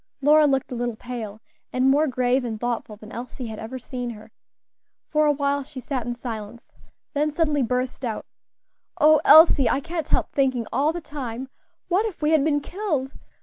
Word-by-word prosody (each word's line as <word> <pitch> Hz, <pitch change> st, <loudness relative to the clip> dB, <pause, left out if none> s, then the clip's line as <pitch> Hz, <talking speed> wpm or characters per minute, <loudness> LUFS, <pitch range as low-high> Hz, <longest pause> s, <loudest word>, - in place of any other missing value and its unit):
Lora 300 Hz, +2 st, +5 dB
looked 270 Hz, -2 st, 0 dB
a -, -, -3 dB
little 240 Hz, -1 st, -2 dB
pale, 220 Hz, -3 st, -7 dB, 0.3 s
and 255 Hz, +1 st, +3 dB
more 300 Hz, +3 st, +3 dB
grave 255 Hz, 0 st, +1 dB
and 225 Hz, -3 st, -4 dB
thoughtful 235 Hz, -2 st, -3 dB
than 215 Hz, +1 st, -13 dB
Elsie 250 Hz, +1 st, -7 dB
had 220 Hz, -2 st, -6 dB
ever 230 Hz, +4 st, -6 dB
seen 250 Hz, -1 st, -5 dB
her. 220 Hz, -1 st, -10 dB, 0.8 s
For 305 Hz, -1 st, +3 dB
a -, -, +5 dB
while 285 Hz, 0 st, 0 dB
she 270 Hz, 0 st, -9 dB
sat 255 Hz, -3 st, -4 dB
in 240 Hz, -, -2 dB
silence, 230 Hz, -2 st, -8 dB, 0.3 s
then 300 Hz, +1 st, +1 dB
suddenly 300 Hz, -2 st, +1 dB
burst 250 Hz, +2 st, -2 dB
out, 230 Hz, -3 st, -3 dB, 0.7 s
"Oh, 305 Hz, 0 st, +6 dB
Elsie! 300 Hz, -5 st, +7 dB
I 265 Hz, -, +2 dB
can't 325 Hz, +1 st, -4 dB
help -, -, 0 dB
thinking 260 Hz, -4 st, +1 dB
all 295 Hz, +3 st, +2 dB
the 345 Hz, +1 st, -5 dB
time, 260 Hz, -4 st, -6 dB, 0.4 s
what 385 Hz, +5 st, +2 dB
if 410 Hz, -, -8 dB
we 300 Hz, 0 st, +1 dB
had 310 Hz, -3 st, +4 dB
been 290 Hz, -1 st, +1 dB
killed! 305 Hz, -8 st, -3 dB
265 Hz, 190 wpm, -24 LUFS, 240-300 Hz, 0.8 s, Elsie